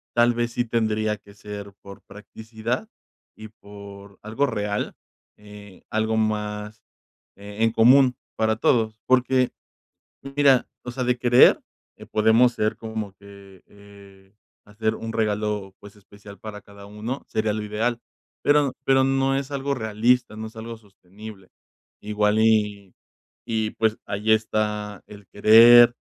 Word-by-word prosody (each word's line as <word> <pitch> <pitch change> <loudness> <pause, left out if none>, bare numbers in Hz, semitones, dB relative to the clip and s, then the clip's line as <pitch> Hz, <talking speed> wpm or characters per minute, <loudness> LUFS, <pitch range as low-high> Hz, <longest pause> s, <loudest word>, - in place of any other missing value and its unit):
tal 120 0 +4
vez 120 0 -2
sí 120 - 0
tendría 110 -2 -1
que 100 0 -19
ser 100 -1 -9
por 100 0 -13
practicidad 110 - -6 0.5
y 110 0 -10
por 100 -1 -13
algo 110 +7 -1
real, 105 -2 -3 0.4
eh, 105 -2 -14
algo 110 0 0
más, 105 0 -3 0.6
eh, 100 +1 -11
en 115 - +3
común 125 +3 +5 0.2
para 110 0 +1
todos, 110 -2 +1
porque, 130 0 +2 0.9
mira, 140 -3 +4 0.2
o 125 - -5
sea, 130 - -4
de 125 0 0
querer 120 0 +5 0.5
podemos 110 +3 +4
ser 110 -2 -1
como 110 -3 -6
que, 100 -2 -16
eh, 100 -1 -18 0.3
hacer 110 +1 -2
un 115 0 -6
regalo, 105 -3 -2
pues, 105 +1 -14
especial 100 0 -15
para 105 -1 -8
cada 100 0 -15
uno, 110 +6 -6
sería 110 -1 -1
lo 110 - -4
ideal, 115 +3 -2 0.4
pero 145 -2 +3
pero 135 0 +3
no 135 0 +1
es 140 0 -4
algo 140 0 -2
realista, 110 0 0
no 110 - -6
es 115 - -18
algo 115 +1 -7
sostenible, 100 -1 -14 0.5
igual 105 0 0
y 105 -3 +1 0.5
y, 110 -2 -1
pues, 110 -1 0
allí 105 +2 -2
está 105 -2 -1
el 105 -1 -14
querer 115 +3 +7
110 Hz, 140 wpm, -23 LUFS, 105-115 Hz, 0.9 s, querer